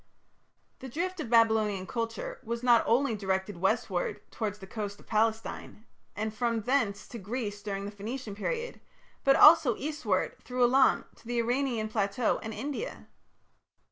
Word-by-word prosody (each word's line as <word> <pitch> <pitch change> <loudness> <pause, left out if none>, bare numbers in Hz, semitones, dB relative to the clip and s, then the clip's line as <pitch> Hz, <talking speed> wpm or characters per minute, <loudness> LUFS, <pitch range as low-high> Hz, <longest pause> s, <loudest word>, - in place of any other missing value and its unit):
" - - -43
The 265 - -8
drift 360 +7 -3
of 260 - -4
Babylonian 220 -4 +3
culture 230 +1 -4
was 235 +1 -4
not 240 -2 +6
only 245 +2 +3
directed 190 -1 -2
westward 190 -3 0
towards 210 -2 -3
the 195 - -10
coast 205 0 -5
of - - -17
Palestine, 220 0 -1 0.3
and 215 +1 -3
from 230 0 0
thence 220 -4 0
to 235 - -7
Greece 205 0 -4
during 200 -1 -4
the 205 - -5
Phoenician 215 +2 -6
period, 470 - -4 0.4
but 275 0 +5
also 300 -7 +7
eastward 305 +1 -2
through 250 0 0
Elam 260 +2 +4
to - - -17
the 240 0 -2
Iranian 240 -1 0
plateau 215 +1 0
and 220 - -5
India. 290 - -5
225 Hz, 155 wpm, -29 LUFS, 205-255 Hz, 0.4 s, also